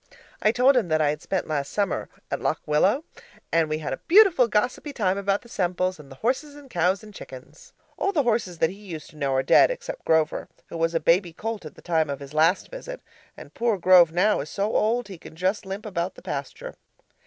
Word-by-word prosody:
I 215 - +4
told 250 +4 +4
him 235 -7 +2
that 155 -1 +1
I 150 -2 +3
had 150 0 -6
spent 190 - -2
last 145 -3 -2
summer 200 -4 -1 0.2
at - - -2
Lock - - 0
Willow, 190 - +2 0.5
and 165 -2 +2
we 155 - -1
had 150 -3 -4
a - - -5
beautiful 365 - +6
gossipy 245 +7 -1
time 195 -7 0
about 200 +1 -1
the - - -15
Semples, 185 -3 -1
and 145 -2 -13
the - - -10
horses 270 - -2
and 285 -3 -14
cows 180 +3 +1
and 210 -1 -12
chickens. 195 - -12 0.3
All 395 - +1
the 300 -7 +1
horses 220 -7 0
that 160 +1 +2
he 195 - -11
used 175 -7 -9
to - - -20
know 140 -2 -1
are 130 - +2
dead, - - +6
except - - -6
Grover, 160 -1 +1 0.2
who 170 - -6
was 165 +1 0
a - - +3
baby 170 +2 +2
colt 220 0 -5
at - - -13
the - - -16
time 160 -3 +1
of 140 -1 -4
his 140 0 -10
last 160 +4 +2
visit - - -7 0.4
and - - -12
poor 230 -3 0
Grove 180 -2 +6
now 195 +5 +2
is 145 - -5
so 205 +2 -2
old 235 +3 +1
he 190 -4 -10
can - - -13
just 190 +4 -1
limp 195 +3 -6
about 185 -3 -3
the - - -14
pasture. - - -6
190 Hz, 235 wpm, -25 LUFS, 160-235 Hz, 0.5 s, beautiful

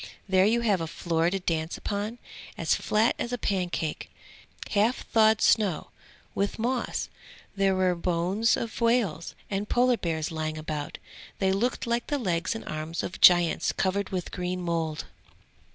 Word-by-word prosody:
There 190 0 +4
you 235 +2 +2
have 205 -6 +2
a 165 - -2
floor 165 +1 0
to 195 +2 -2
dance 165 -2 -2
upon, 210 +3 -3 0.4
as - - +1
flat 220 +3 +2
as 240 - -3
a 245 - -1
pancake, 180 -7 -2 0.6
half 220 +4 +1
thawed 220 -1 +4
snow, 200 -8 +2 0.4
with 200 +1 -1
moss. 245 +2 -1 0.5
There 195 -1 +2
were 185 -1 +2
bones 180 +5 +1
of 230 +1 -5
whales 230 -8 +1 0.2
and 200 +1 -2
Polar 245 0 +3
bears 160 -4 -2
lying 155 -1 -3
about; 155 -2 -5 0.4
they 190 -1 +2
looked 230 +6 0
like 235 0 -1
the 290 - 0
legs 180 -6 -1
and 225 - -7
arms 155 +2 -4
of 180 - -6
giants 175 -2 +6
covered 195 +1 -1
with 185 -2 -4
green 180 0 -3
mould. 165 -3 -2
190 Hz, 155 wpm, -27 LUFS, 170-220 Hz, 0.6 s, giants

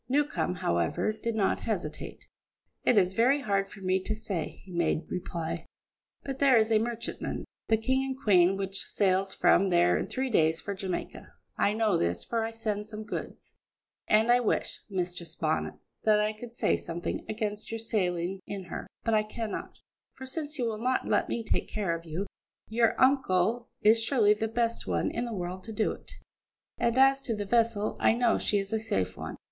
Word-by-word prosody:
Newcombe, 285 -8 +1
however, 85 - 0
did 230 +1 -3
not 205 -3 +1
hesitate. - - -4 0.6
"It 240 - +4
is 185 -1 +4
very 255 +7 +3
hard 195 -4 0
for 195 - -12
me 185 0 +2
to 215 +3 -3
say," 200 -6 -4
he 190 - -12
made 170 -2 +1
reply, 170 -2 -4 0.6
"but 270 -1 -5
there 270 -3 +6
is 220 0 +3
a 220 - +5
merchantman, 235 +1 -4 0.2
the 220 - +4
King 260 +4 +1
and 265 -1 -3
Queen, 195 -5 +4
which 195 0 -4
sails 190 -1 +1
from 195 0 +4
here 175 0 +4
in - - -2
three 260 -1 -2
days 160 -5 +3
for 200 - -4
Jamaica. 190 -2 -5 0.2
I 205 - +2
know 215 -2 +2
this, 85 +1 0
for 230 -1 -1
I 225 - -1
send 215 -2 -3
some 215 0 -6
goods; - - -7 0.5
and 220 +3 +4
I 245 - +6
wish, 240 - -1
Mistress 175 -3 -3
Bonnet, 155 -1 -1 0.3
that 215 -1 +5
I 210 +1 +1
could 235 +2 -10
say - - +2
something 170 +1 -4
against 210 -1 -3
your 225 - -2
sailing 190 -4 -1
in 200 -2 -5
her, 180 - -6 0.2
but 230 - +1
I 215 - +5
cannot; 215 +1 -5 0.4
for, 265 - -8
since 300 +2 -4
you 250 - 0
will 220 -2 -2
not 255 +2 0
let - - +2
me 235 - -2
take - - -1
care 195 -6 -1
of 165 0 -8
you, 165 +5 -3 0.4
your 230 0 +2
uncle 240 -4 +3
is 220 +2 +6
surely 225 -3 +4
the 220 +1 -2
best 230 +1 -1
one - - 0
in 235 - -2
the 235 - -4
world 180 0 -4
to 225 - -6
do 215 0 +1
it; - - -10 0.7
and 235 0 +1
as 270 +1 +5
to 230 -4 -2
the 205 -1 -3
vessel, 225 -1 +1
I - - +4
know 240 -1 +3
she 205 - +1
is 200 +2 -2
a 220 - +2
safe 95 - -1
one." - - -6
215 Hz, 195 wpm, -29 LUFS, 185-230 Hz, 0.7 s, there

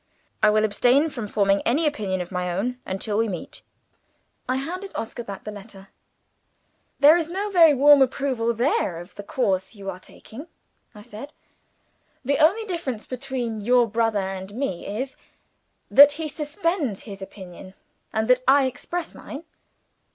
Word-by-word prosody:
I 215 - +6
will 215 +1 +3
abstain 250 +8 +3
from 235 -6 -5
forming 200 -1 +2
any 290 +8 +1
opinion 205 -11 -1
of 180 - -7
my 180 -1 -2
own 245 +8 -2
until 205 +3 -2
we 225 - +2
meet." 180 -5 -6 0.9
I 255 - +2
handed 360 +9 -5
Oscar 230 +1 -5
back 200 -3 -8
the 210 - -6
letter. 195 -1 -12 1.1
"There 295 +3 +8
is 335 -2 -1
no 400 +4 -3
very 330 -5 +6
warm 285 +1 +7
approval 255 -3 +1
there 235 - 0
of 175 +3 -12
the - - -8
course 200 -2 -1
you 195 -1 -5
are 180 - -10
taking," 255 - -12 0.5
I 210 - -11
said. 240 +6 -10 0.9
"The 280 +2 +1
only 395 +9 +4
difference 330 - -4
between 250 -4 -4
your 245 +3 +4
brother 225 0 0
and 190 0 -6
me 240 -9 -3
is, 255 +7 -4 0.7
that 285 +1 +9
he 315 +1 -4
suspends 300 - -2
his 200 -3 -9
opinion, 190 -1 -11 0.4
and 220 0 -1
that 250 0 +4
I 275 0 +6
express 325 +6 -4
mine." 285 +3 -9
240 Hz, 160 wpm, -24 LUFS, 200-285 Hz, 1.1 s, that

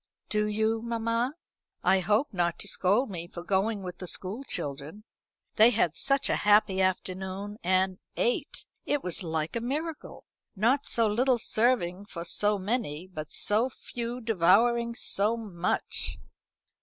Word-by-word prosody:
"Do 210 0 +1
you, 220 +1 0
mamma? 230 +3 -1 0.5
I 190 +1 +4
hope 210 +9 +1
not 175 -2 0
to - - -4
scold 205 +6 +2
me 170 -2 -5
for 170 -1 -9
going 200 +2 0
with 180 -1 -7
the 180 - -6
school 195 +9 -4
children. 145 - -5 0.5
They 220 +1 +8
had 190 -9 +1
such 275 0 +1
a - - +1
happy 205 -2 +4
afternoon; 190 +2 -2
and 185 +1 +1 0.2
ate! 245 +5 -1 0.2
it 290 -1 -1
was 180 0 -1
like 160 -1 -3
a 235 - -1
miracle. 300 +6 -4 0.3
Not 240 +8 +2
so 230 - +3
little 245 +4 +2
serving 215 -5 +1
for 170 -4 -7
so 210 +4 +1
many, 190 -6 -2
but 155 -5 -8
so 220 +5 +3
few 240 0 -6
devouring 230 +4 +3
so 215 0 +1
much." 185 -6 -1
210 Hz, 145 wpm, -28 LUFS, 185-235 Hz, 0.5 s, They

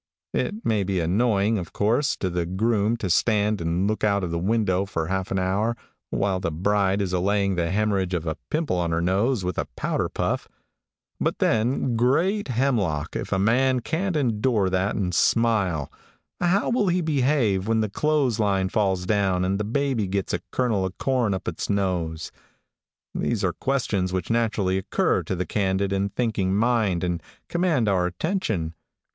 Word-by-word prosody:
It 215 +2 -2
may 110 -3 +2
be 95 -1 -1
annoying, 105 +4 +2
of 85 - -8
course, 115 +8 +1
to 95 - -2
the 85 -1 -1
groom 110 +4 +1
to 105 - -3
stand 105 +2 +2
and 85 +4 0
look 110 +1 -2
out 100 -2 +2
of 85 - -2
the 85 - -1
window 100 -1 +1
for 85 -4 -2
half 95 -1 -1
an 95 - -1
hour 100 +5 0 0.3
while 95 -2 0
the 90 - -1
bride 100 +4 +1
is 90 -1 -3
allaying 100 +2 +1
the 85 -2 -1
hemorrhage 95 -2 0
of 85 -1 -3
a 80 -1 -2
pimple 155 - 0
on 85 -1 0
her 80 0 0
nose 100 +4 +1
with 90 -2 -2
a - - -2
powder - - -1
puff, - - -2 0.7
but - - 0
then, 120 +2 +1
great 165 - +2
hemlock! 115 - 0
if - - -4
a - - +2
man 125 +6 +2
can't 175 +8 -2
endure 115 -7 +1
that 95 +3 0
and 90 -4 -1
smile, 100 - +2 0.5
how 180 +6 +2
will 235 -4 +2
he 180 0 +2
behave 130 - +1
when 110 0 +2
the 110 - 0
clothesline 110 -8 +1
falls 95 -3 0
down 95 -2 +1
and 95 +2 0
the - - 0
baby 120 -1 0
gets 95 0 -2
a - - 0
kernel 115 -7 0
of 95 -1 -4
corn 125 -5 +1
up 95 -1 -3
its 85 - -3
nose? 90 -6 -1 0.8
These - - -1
are - - +1
questions 110 -9 -1
which 95 +2 -2
naturally 105 -5 +1
occur 95 - +1
to - - -3
the 90 +1 -2
candid 95 0 0
and 100 +1 0
thinking 105 -6 0
mind 110 -5 +1
and 90 -2 -1 0.3
command 170 -10 +1
our 90 -3 +2
attention. 95 - -2
100 Hz, 175 wpm, -24 LUFS, 95-120 Hz, 0.8 s, may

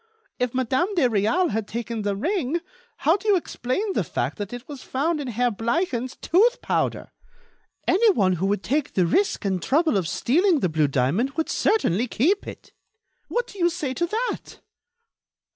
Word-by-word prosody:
If 250 0 -1
Madame 260 +7 +1
de 335 - +3
Réal 225 - +1
had 220 -1 -2
taken 230 -1 -4
the 205 -1 -1
ring, 335 - -1 0.5
how 325 +6 +5
do 415 - -9
you 410 - +5
explain 370 - -2
the - - +1
fact - - -3
that 205 -1 -4
it 245 +1 -8
was 285 -3 -8
found 300 +4 -1
in 275 - -5
Herr 245 +1 0
Bleichen's 245 - -1
tooth 460 +9 +3
powder? - - -1 0.8
Anyone 360 - +3
who 190 +4 0
would 205 0 0
take 285 +3 -1
the 185 - +3
risk 380 - +1
and 190 -2 0
trouble 310 - +2
of 180 -4 -1
stealing 330 - +2
the 180 - +1
blue 155 -2 +2
diamond 140 - 0
would 320 0 -2
certainly 245 - +1
keep 345 - +1
it. - - -10 0.5
What 485 - -1
do 405 - -13
you 345 0 +4
say 310 -6 -3
to 345 +6 -1
that?" 460 +7 -3
260 Hz, 175 wpm, -24 LUFS, 215-350 Hz, 0.8 s, how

